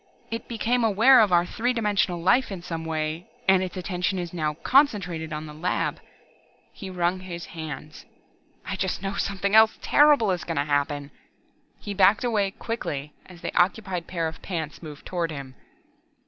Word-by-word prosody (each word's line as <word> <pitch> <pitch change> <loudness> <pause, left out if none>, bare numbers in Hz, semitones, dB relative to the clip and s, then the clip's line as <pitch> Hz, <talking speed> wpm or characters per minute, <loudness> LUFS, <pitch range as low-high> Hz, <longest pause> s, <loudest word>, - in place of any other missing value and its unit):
It 230 - -4
became 235 +1 0
aware 225 +5 +6
of 210 -3 +3
our 175 0 +4
three 240 +7 -1
dimensional 205 -6 0
life 210 +8 +3
in 180 -3 -6
some 165 -2 -5
way, 160 +1 -3 0.2
and 190 -1 +5
its 185 0 -4
attention 180 +1 -2
is 175 -1 -4
now 155 -3 -1
concentrated 180 - +2
on 150 +1 -4
the 150 - -9
laboratory!" 170 +4 -2 0.6
He 195 - -8
wrung 180 0 0
his 175 -2 -7
hands. 155 -2 -8 0.6
"I - - -3
just - - -2
know 195 0 -2
something 200 0 -2
else 220 0 +6
terrible 290 -8 +4
is 180 -1 -2
going 165 - -4
to 140 - +2
happen!" 145 0 -1 0.7
He 205 - -6
backed 200 +4 +4
away 215 -5 +1
quickly 150 -10 -5
as 175 -2 -14
the - - -5
occupied 185 -1 +1
pair 165 -3 -2
of 160 0 -8
pants 160 -5 -5
moved 150 -3 -10
toward 175 -2 -2
him. 140 -4 -7
180 Hz, 175 wpm, -25 LUFS, 160-205 Hz, 0.7 s, aware